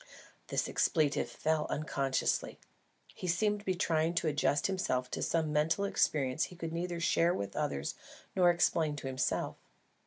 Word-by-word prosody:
The - - -1
expletive 155 -5 +1
fell 155 0 0
unconsciously. 140 -3 -1 0.6
He 185 - -6
seemed 205 +4 +1
to 205 - -15
be 185 - +2
trying 165 -1 +1
to 165 - +1
adjust 145 -1 +1
himself 185 -10 -1
to - - -3
some 160 -2 0
mental 160 +6 +2
experience 135 -9 +1
he 180 - -11
could 165 -2 -5
neither 170 0 -2
share 170 +1 +3
with 100 -1 -4
others 70 0 -2 0.4
nor 180 -2 +5
explain 165 -3 +2
to 145 - -8
himself. 130 0 -1
160 Hz, 155 wpm, -32 LUFS, 145-175 Hz, 0.6 s, nor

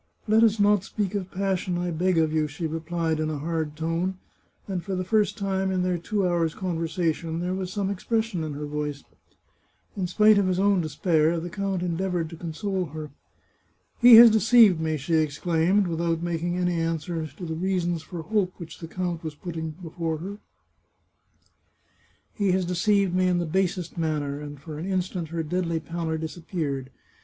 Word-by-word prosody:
" - - -36
Let 220 +2 +5
us 220 -1 +3
not 205 -1 +4
speak 200 -1 -3
of 195 -3 -3
passion, 190 -2 -1
I 175 0 -2
beg 180 +2 +1
of 160 -1 +2
you," 155 -1 +1
she 150 +3 -5
re 160 +1 -2
plied 160 -1 -1
in 155 0 0
a 155 - -2
hard 160 0 -3
tone, 165 +4 -1 0.5
and 185 -4 -3
for 195 -2 -3
the 185 - -1
first 210 +2 +1
time 195 -1 -1
in 185 -1 0
their 180 -1 0
two 195 +2 0
hours' 170 -3 0
conversation 165 -2 -2
there 180 +1 -2
was 185 -1 -3
some 200 0 -1
expression 220 -2 -1
in 155 -2 -4
her 150 +1 -5
voice. 150 -1 -4 0.9
In 185 -3 -1
spite 210 +3 +5
of 195 - +2
his 185 -1 +1
own 195 -1 +3
despair, 160 +1 +1
the 175 +1 -6
count 195 -1 -2
endeavoured 175 -1 -1
to - - -7
con 165 0 -6
sole 190 +2 -2
her. 155 0 -7 0.4
" - - -42
He 240 -1 +10
has 230 0 +11
deceived 220 -4 +6
me," 160 -1 0
she 145 +4 -3
exclaimed, 165 +5 +2
without 165 -1 -1
making 175 +1 -1
any 180 -1 0
answer 165 0 -2
to 155 +5 -9
the 160 - -3
reasons 175 -1 -1
for 170 0 -7
hope 185 +1 0
which 170 -2 -9
the 165 - -7
count 175 -1 -3
was 155 -2 -5
putting 160 0 -5
before 165 -1 -3
her; 195 +6 -7 1.0
" - - -39
he 200 -2 +3
has 185 -1 +1
deceived 195 +1 +2
me 185 0 +2
in 180 -1 +2
the 175 - 0
basest 180 0 -1
manner," 150 -3 -1
and 145 -1 -8
for 150 +1 -8
an 170 - -4
instant 180 -2 -2
her 165 +1 -3
deadly 170 0 -1
pallor 165 0 -3
disappeared. 155 -4 -4
175 Hz, 195 wpm, -26 LUFS, 160-190 Hz, 1.0 s, has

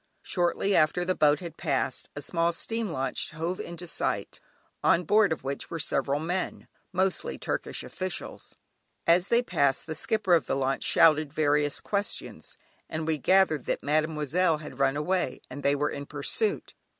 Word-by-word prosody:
Shortly 180 +2 0
after 155 +3 +3
the 185 - +1
boat 150 0 +3
had 170 -2 -8
passed, 130 -1 -1
a 145 - -5
small 170 +2 +1
steam 225 +5 -3
launch 135 -5 -2
hove 165 +3 -3
into 170 +1 -6
sight, 170 - -2 0.4
on 170 - +4
board 205 +3 +4
of 160 - -2
which 135 +1 -4
were 165 - -4
several 140 -2 0
men, 180 +4 -3 0.2
mostly 190 - 0
Turkish - - -3
officials. 185 -1 -5 0.5
As 175 +3 +4
they 235 +1 +3
passed, 140 - +1
the 160 - -4
skipper 195 +3 +1
of 165 - +3
the - - 0
launch 135 0 0
shouted 155 -2 +4
various 145 -1 +1
questions, 205 0 -3 0.3
and 160 0 -3
we 155 -1 0
gathered 185 -4 +3
that - - -2
"Mademoiselle" 155 +3 +1
had 150 -3 -10
run 135 +1 +2
away 180 -2 -1
and 140 +2 -6
they 140 0 +2
were 145 +1 0
in 140 0 -6
pursuit. 150 - -1
160 Hz, 165 wpm, -28 LUFS, 145-180 Hz, 0.5 s, on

